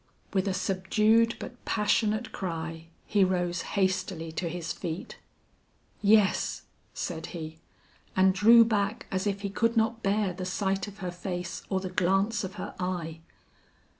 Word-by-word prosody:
With 190 Hz, 0 st, +1 dB
a 195 Hz, -, +1 dB
subdued 215 Hz, +5 st, +2 dB
but 245 Hz, -1 st, -9 dB
passionate 215 Hz, +1 st, +1 dB
cry 165 Hz, -2 st, -5 dB, 0.2 s
he 205 Hz, -2 st, +3 dB
rose 175 Hz, -2 st, 0 dB, 0.2 s
hastily 185 Hz, -3 st, 0 dB
to 170 Hz, +2 st, -3 dB
his 165 Hz, -1 st, -4 dB
feet. 165 Hz, +1 st, -6 dB, 0.8 s
"Yes," 210 Hz, -1 st, +3 dB, 0.3 s
said 160 Hz, -2 st, -4 dB
he, 160 Hz, 0 st, -7 dB, 0.6 s
and 190 Hz, 0 st, +5 dB
drew 230 Hz, +4 st, +7 dB
back 210 Hz, -1 st, 0 dB
as 190 Hz, +2 st, 0 dB
if 200 Hz, 0 st, -1 dB
he 200 Hz, -, -2 dB
could 230 Hz, +3 st, +1 dB
not 225 Hz, +1 st, +2 dB
bear 200 Hz, -2 st, +1 dB
the 185 Hz, +1 st, -6 dB
sight 195 Hz, +2 st, -1 dB
of 205 Hz, 0 st, -10 dB
her 180 Hz, -, -2 dB
face 175 Hz, -1 st, -5 dB
or 190 Hz, -, +1 dB
the 185 Hz, -1 st, -4 dB
glance 195 Hz, +5 st, +1 dB
of 190 Hz, +1 st, -5 dB
her 185 Hz, -, -6 dB
eye. 175 Hz, -3 st, -3 dB
190 Hz, 150 wpm, -28 LUFS, 175-210 Hz, 0.8 s, drew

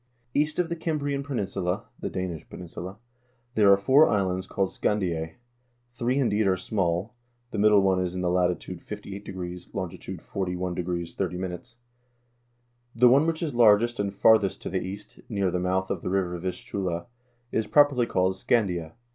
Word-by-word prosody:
"East 150 Hz, +1 st, +1 dB
of 180 Hz, -2 st, +1 dB
the 170 Hz, -, -3 dB
Cimbrian 145 Hz, -4 st, -2 dB
peninsula 100 Hz, -6 st, -2 dB
(the -, -, -3 dB
Danish 90 Hz, -4 st, -5 dB
peninsula) 90 Hz, +2 st, -8 dB, 0.6 s
there 105 Hz, -3 st, +5 dB
are 100 Hz, -, +7 dB
four 130 Hz, +10 st, +5 dB
islands 95 Hz, -3 st, 0 dB
called 95 Hz, -1 st, -1 dB
Scandise; 85 Hz, -6 st, -1 dB, 0.6 s
three 120 Hz, +2 st, 0 dB
indeed 110 Hz, -6 st, +2 dB
are 95 Hz, -1 st, +3 dB
small; 95 Hz, +2 st, -1 dB, 0.4 s
the 110 Hz, -, -3 dB
middle 105 Hz, -1 st, +6 dB
one 95 Hz, -1 st, +3 dB
is 90 Hz, 0 st, -2 dB
in 90 Hz, -, -2 dB
the 90 Hz, -1 st, +1 dB
latitude 90 Hz, 0 st, 0 dB
58°, 95 Hz, -4 st, -7 dB
longitude 95 Hz, -1 st, -5 dB
41° 90 Hz, -2 st, -3 dB
30'. 90 Hz, +2 st, -4 dB, 1.2 s
The 125 Hz, +1 st, +6 dB
one 140 Hz, +6 st, +5 dB
which 165 Hz, +1 st, -1 dB
is 150 Hz, -4 st, -2 dB
largest 120 Hz, 0 st, +5 dB
and 100 Hz, -1 st, 0 dB
farthest 100 Hz, 0 st, +4 dB
to -, -, -3 dB
the 95 Hz, 0 st, 0 dB
east, 100 Hz, +3 st, -8 dB
near 100 Hz, -4 st, 0 dB
the 90 Hz, -, 0 dB
mouth 95 Hz, +1 st, 0 dB
of -, -, -2 dB
the -, -, -3 dB
river 90 Hz, -2 st, 0 dB
Vistula, 90 Hz, -1 st, -3 dB, 0.5 s
is 110 Hz, -1 st, 0 dB
properly 140 Hz, -4 st, +4 dB
called 95 Hz, +1 st, +1 dB
Scandia. 95 Hz, -5 st, 0 dB
95 Hz, 155 wpm, -26 LUFS, 90-110 Hz, 1.2 s, are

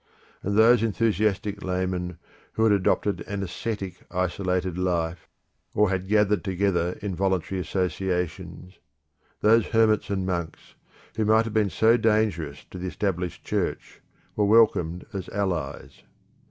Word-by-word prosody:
And 100 Hz, +2 st, -1 dB
those 115 Hz, +1 st, +6 dB
enthusiastic 105 Hz, -2 st, 0 dB
laymen 90 Hz, -1 st, -2 dB, 0.4 s
who 110 Hz, -, 0 dB
had 110 Hz, -2 st, +5 dB
adopted 100 Hz, +1 st, +1 dB
an 100 Hz, -1 st, -3 dB
ascetic 95 Hz, 0 st, -5 dB
isolated 90 Hz, 0 st, -1 dB
life, 85 Hz, -2 st, -2 dB, 0.5 s
or 105 Hz, -2 st, +3 dB
had 95 Hz, 0 st, -2 dB
gathered 105 Hz, 0 st, +2 dB
together 95 Hz, -2 st, 0 dB
in 100 Hz, -2 st, -2 dB
voluntary 95 Hz, 0 st, -1 dB
associations; 90 Hz, 0 st, -3 dB, 0.6 s
those 115 Hz, +1 st, +4 dB
hermits 110 Hz, -2 st, +2 dB
and 95 Hz, -2 st, -1 dB
monks, 85 Hz, -4 st, -4 dB, 0.4 s
who 110 Hz, -, +1 dB
might 110 Hz, +1 st, +4 dB
have 115 Hz, -, -5 dB
been 110 Hz, -3 st, +2 dB
so 115 Hz, +5 st, +4 dB
dangerous 105 Hz, -10 st, 0 dB
to 90 Hz, -, -7 dB
the 90 Hz, -, -4 dB
Established 90 Hz, -2 st, -3 dB
Church, -, -, -3 dB, 0.3 s
were 105 Hz, -, +2 dB
welcomed 100 Hz, -6 st, +3 dB
as 95 Hz, -2 st, -5 dB
allies. 85 Hz, -9 st, -3 dB
95 Hz, 130 wpm, -25 LUFS, 90-105 Hz, 0.6 s, those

